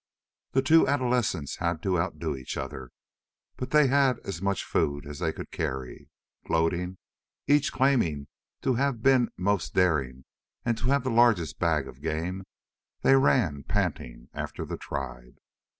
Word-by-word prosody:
The 135 Hz, -, +3 dB
two 160 Hz, +4 st, +5 dB
adolescents 125 Hz, -, 0 dB
had 85 Hz, -2 st, -2 dB
to 95 Hz, -3 st, +1 dB
outdo 85 Hz, -3 st, -2 dB
each 65 Hz, -2 st, -6 dB
other. 65 Hz, -1 st, -6 dB, 0.7 s
But 125 Hz, -, -5 dB
they 150 Hz, +1 st, +5 dB
had 135 Hz, -1 st, +3 dB
as 90 Hz, -4 st, -6 dB
much 100 Hz, -1 st, 0 dB
food 70 Hz, 0 st, -1 dB
as 75 Hz, +1 st, -8 dB
they 80 Hz, -2 st, 0 dB
could -, -, -9 dB
carry. 65 Hz, -2 st, -4 dB, 0.4 s
Gloating 85 Hz, +3 st, 0 dB, 0.5 s
each 145 Hz, 0 st, +3 dB
claiming 120 Hz, -, +1 dB, 0.4 s
to 130 Hz, -, +2 dB
have 125 Hz, -2 st, 0 dB
been 130 Hz, -3 st, +4 dB
most 100 Hz, +1 st, -1 dB
daring 65 Hz, -8 st, +1 dB, 0.4 s
and 120 Hz, -1 st, +1 dB
to -, -, -6 dB
have 140 Hz, 0 st, +2 dB
the 130 Hz, -, -1 dB
largest 115 Hz, -9 st, +3 dB
bag 80 Hz, -6 st, +1 dB
of 65 Hz, -, -12 dB
game 85 Hz, +5 st, -3 dB, 0.6 s
they 135 Hz, -, +6 dB
ran 110 Hz, -, +3 dB
panting -, -, -3 dB
after -, -, -5 dB
the -, -, -4 dB
tribe. 65 Hz, -3 st, -6 dB
90 Hz, 150 wpm, -27 LUFS, -, 0.7 s, they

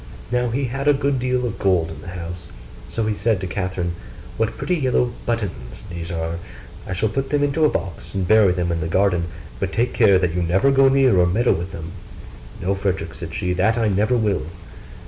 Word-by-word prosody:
Now 125 Hz, 0 st, +1 dB
he 130 Hz, +5 st, -1 dB
had 135 Hz, +3 st, -3 dB
a 145 Hz, -, +6 dB
good 140 Hz, -1 st, 0 dB
deal 125 Hz, 0 st, 0 dB
of 115 Hz, -, -4 dB
gold 90 Hz, -4 st, +2 dB
in 80 Hz, -1 st, -9 dB
the -, -, -12 dB
house: 85 Hz, 0 st, -7 dB, 0.4 s
so 115 Hz, -, -2 dB
he 110 Hz, -, +1 dB
said 105 Hz, 0 st, +1 dB
to 95 Hz, -, -4 dB
Catherine, 90 Hz, -2 st, -2 dB, 0.4 s
'What 115 Hz, 0 st, -1 dB
pretty 180 Hz, -, 0 dB
yellow 125 Hz, -4 st, +1 dB
buttons 90 Hz, -, -3 dB
these 85 Hz, -1 st, -5 dB
are! 85 Hz, -1 st, -3 dB, 0.5 s
I -, -, -3 dB
shall 100 Hz, +4 st, +1 dB
put 135 Hz, +5 st, -2 dB
them 145 Hz, -1 st, +1 dB
into 145 Hz, +2 st, +2 dB
a -, -, +5 dB
box 95 Hz, -3 st, -5 dB
and 95 Hz, -2 st, -1 dB
bury 110 Hz, -2 st, +6 dB
them 90 Hz, -1 st, -1 dB
in 85 Hz, -1 st, -1 dB
the 80 Hz, -, -2 dB
garden; 90 Hz, -1 st, +2 dB, 0.3 s
but 95 Hz, 0 st, -2 dB
take 120 Hz, +3 st, 0 dB
care 100 Hz, -2 st, +5 dB
that 90 Hz, -3 st, 0 dB
you 90 Hz, -, 0 dB
never 95 Hz, +11 st, +3 dB
go 135 Hz, 0 st, +5 dB
near 135 Hz, -7 st, +4 dB
or 90 Hz, -, +5 dB
meddle 115 Hz, +7 st, +3 dB
with 85 Hz, +3 st, -4 dB
them.' 80 Hz, +1 st, -7 dB, 0.7 s
'No, 95 Hz, +2 st, 0 dB
Frederick,' 95 Hz, -4 st, -2 dB
said 80 Hz, +2 st, -7 dB
she, 90 Hz, -2 st, -1 dB
'that 95 Hz, +6 st, +2 dB
I 115 Hz, -2 st, +2 dB
never 105 Hz, +5 st, +2 dB
will. 105 Hz, -4 st, 0 dB
100 Hz, 220 wpm, -22 LUFS, 90-120 Hz, 0.7 s, a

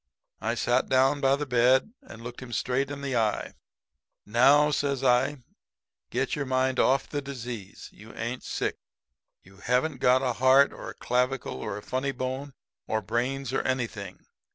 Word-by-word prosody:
"I 115 Hz, +2 st, -1 dB
sat 120 Hz, +2 st, +1 dB
down 135 Hz, +2 st, +3 dB
by 135 Hz, 0 st, +4 dB
the 150 Hz, +1 st, -3 dB
bed 130 Hz, -, +3 dB
and 115 Hz, +1 st, -12 dB
looked 120 Hz, 0 st, -7 dB
him 130 Hz, -2 st, -9 dB
straight 130 Hz, +5 st, 0 dB
in 140 Hz, 0 st, -6 dB
the 135 Hz, -2 st, -2 dB
eye. 110 Hz, -3 st, 0 dB, 0.7 s
"'Now,' 140 Hz, +7 st, +5 dB
says 140 Hz, -2 st, -1 dB
I, 130 Hz, +2 st, +2 dB, 0.7 s
'get 130 Hz, +3 st, -1 dB
your 140 Hz, -2 st, -3 dB
mind 130 Hz, 0 st, +1 dB
off 135 Hz, +1 st, +3 dB
the 145 Hz, -, -3 dB
disease. 120 Hz, -7 st, -7 dB
You 110 Hz, +2 st, -14 dB
ain't 120 Hz, +2 st, -4 dB
sick. -, -, -3 dB, 0.7 s
You 95 Hz, +1 st, -18 dB
haven't 125 Hz, +7 st, 0 dB
got 130 Hz, +1 st, +4 dB
a 125 Hz, -2 st, +1 dB
heart 130 Hz, +3 st, +5 dB
or -, -, -8 dB
a -, -, -9 dB
clavicle 125 Hz, -, -1 dB
or 100 Hz, -, -4 dB
a 105 Hz, -, -9 dB
funny 130 Hz, +2 st, -2 dB
bone 130 Hz, +2 st, -4 dB, 0.3 s
or 110 Hz, -1 st, -1 dB
brains 130 Hz, +5 st, -2 dB
or -, -, +1 dB
anything. 115 Hz, -7 st, -4 dB
130 Hz, 170 wpm, -27 LUFS, 120-135 Hz, 0.7 s, Now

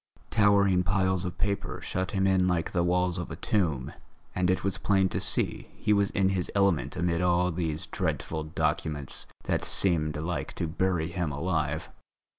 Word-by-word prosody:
Towering 100 Hz, -4 st, +4 dB
piles 95 Hz, 0 st, +1 dB
of 90 Hz, 0 st, -5 dB
papers 100 Hz, -1 st, -2 dB
shut 95 Hz, +1 st, -2 dB
him 95 Hz, -2 st, 0 dB
in 95 Hz, -1 st, +3 dB
like 90 Hz, -2 st, 0 dB
the 85 Hz, -, +1 dB
walls 90 Hz, +1 st, +1 dB
of 90 Hz, -, -5 dB
a -, -, -5 dB
tomb, 80 Hz, -11 st, -1 dB, 0.4 s
and 90 Hz, -1 st, +1 dB
it 95 Hz, -, +1 dB
was 100 Hz, -1 st, -1 dB
plain 95 Hz, -2 st, +2 dB
to -, -, -2 dB
see -, -, 0 dB
he 105 Hz, -, +1 dB
was 100 Hz, -1 st, +3 dB
in 95 Hz, -1 st, +2 dB
his 95 Hz, -2 st, -1 dB
element 100 Hz, -5 st, +2 dB
amid 85 Hz, -1 st, 0 dB
all 90 Hz, 0 st, +2 dB
these 80 Hz, -2 st, -2 dB
dreadful 80 Hz, -1 st, -2 dB
documents 75 Hz, -2 st, -2 dB, 0.2 s
that -, -, -1 dB
seemed 80 Hz, -5 st, +1 dB
like 85 Hz, +3 st, -3 dB
to -, -, -2 dB
bury 85 Hz, 0 st, 0 dB
him 85 Hz, -3 st, -2 dB
alive. 80 Hz, 0 st, -2 dB
90 Hz, 175 wpm, -28 LUFS, 85-95 Hz, 0.4 s, Towering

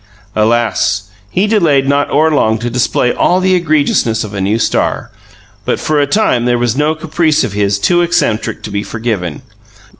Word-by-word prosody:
Alas! 110 Hz, -3 st, 0 dB, 0.2 s
he 185 Hz, -, 0 dB
delayed 165 Hz, -11 st, +2 dB
not 140 Hz, +1 st, +1 dB
o'er 155 Hz, +3 st, +2 dB
long 110 Hz, -7 st, +2 dB
to 120 Hz, +2 st, -4 dB
display 125 Hz, 0 st, 0 dB
all 180 Hz, -, +2 dB
the 185 Hz, 0 st, +2 dB
egregiousness 150 Hz, -9 st, +1 dB
of 105 Hz, -1 st, -8 dB
a 100 Hz, -, -3 dB
new 100 Hz, +4 st, +1 dB
star; 115 Hz, -, -1 dB, 0.5 s
but -, -, -1 dB
for 155 Hz, -1 st, 0 dB
a 145 Hz, -, +1 dB
time 145 Hz, -, +1 dB
there 120 Hz, 0 st, +2 dB
was 120 Hz, -1 st, 0 dB
no 150 Hz, +3 st, +1 dB
caprice 155 Hz, -1 st, 0 dB
of 115 Hz, -6 st, -3 dB
his 100 Hz, -1 st, 0 dB
too 175 Hz, -, +2 dB
eccentric 115 Hz, -10 st, -1 dB
to 105 Hz, -, -6 dB
be 100 Hz, 0 st, -2 dB
forgiven. 105 Hz, -9 st, -4 dB
120 Hz, 180 wpm, -13 LUFS, 110-155 Hz, 0.5 s, delayed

